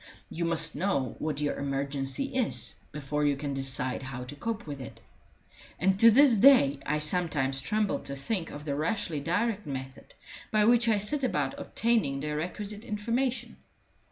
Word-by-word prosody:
You 170 +1 -2
must 165 -1 0
know 145 - -1
what 150 -2 -2
your 145 - -1
emergency 140 - -2
is 170 - 0
before 150 0 -2
you 145 -1 +2
can 140 0 -3
decide 130 -1 -1
how 130 -1 -6
to 130 +4 -8
cope 230 +8 -4
with 145 -3 -6
it; 125 - -9 0.8
and 190 +2 +2
to 230 - +8
this 250 0 +6
day 195 - +6
I 150 - +1
sometimes 150 -4 0
tremble 210 +8 0
to 140 - -7
think 170 +5 -3
of 145 +1 -9
the 145 - -1
rashly 160 +1 -1
direct 205 +6 -1
method 130 -1 -7 0.3
by 215 -1 +3
which 235 0 +4
I 215 - +4
set 265 +8 0
about 145 - 0
obtaining 220 -13 0
the 150 +1 -3
requisite 200 +6 -5
information. 235 +4 -2
155 Hz, 165 wpm, -29 LUFS, 140-215 Hz, 0.8 s, to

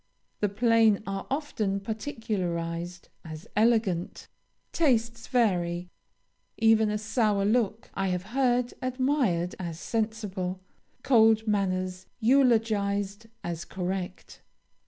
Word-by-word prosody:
The 205 - +1
plain 225 0 +3
are 195 0 -4
often 255 -9 -1
particularized 180 -7 -4
as 160 +1 -9
elegant; 215 -5 +1 0.4
tastes 235 -7 +1
vary: 180 -7 +1 0.7
even 220 -1 +4
a 210 - 0
sour 215 -2 +1
look 215 0 0
I 195 0 -1
have 180 -1 -1
heard 250 -2 +2
admired 255 - 0
as 170 -3 -5
sensible, 210 -5 -2 0.4
cold 220 -3 +4
manners 185 -3 -1
eulogized 220 -5 +2 0.2
as 170 -1 -4
correct. 185 0 -5
210 Hz, 95 wpm, -28 LUFS, 185-230 Hz, 0.7 s, even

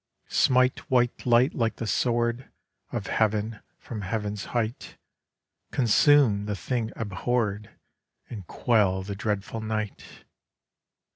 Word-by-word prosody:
Smite 130 -2 +3
white 125 -1 +1
light 120 +2 +4
like 115 -3 0
the 115 - -5
sword 120 +2 0 0.4
Of - - -3
Heav'n 110 0 0 0.2
from 110 -4 -7
heav'n's 105 +1 -3
height; 120 0 -3 0.7
Consume 120 -3 +4
the 105 - -2
thing 115 +3 -2
abhor'd 105 0 -2 0.6
And 100 -7 -8
quell 100 -6 +1
the 100 +1 -5
dreadful 105 +2 -3
night! 110 -2 -5
110 Hz, 110 wpm, -26 LUFS, 105-120 Hz, 0.7 s, light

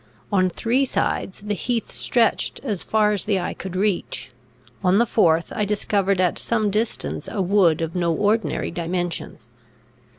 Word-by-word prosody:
On 185 -2 +3
three 235 +9 +1
sides, 195 -7 -1
the 210 0 -2
heath 230 +3 -2
stretched 235 -3 +1
as 210 -9 -2
far 215 -1 +2
as 205 - -1
the 205 -3 +1
eye 175 - -3
could 190 -1 -7
reach; 185 - -1 0.5
on 185 +1 +4
the 235 - +4
fourth, 170 -7 +2
I 210 - 0
discovered 200 -2 +1
at 180 -2 +2
some 220 -3 +1
distance 215 +3 -2
a - - -4
wood 185 -4 +3
of 165 0 -2
no 170 -2 +1
ordinary 210 +6 0
dimensions. 175 -7 -3
200 Hz, 160 wpm, -23 LUFS, 175-215 Hz, 0.5 s, on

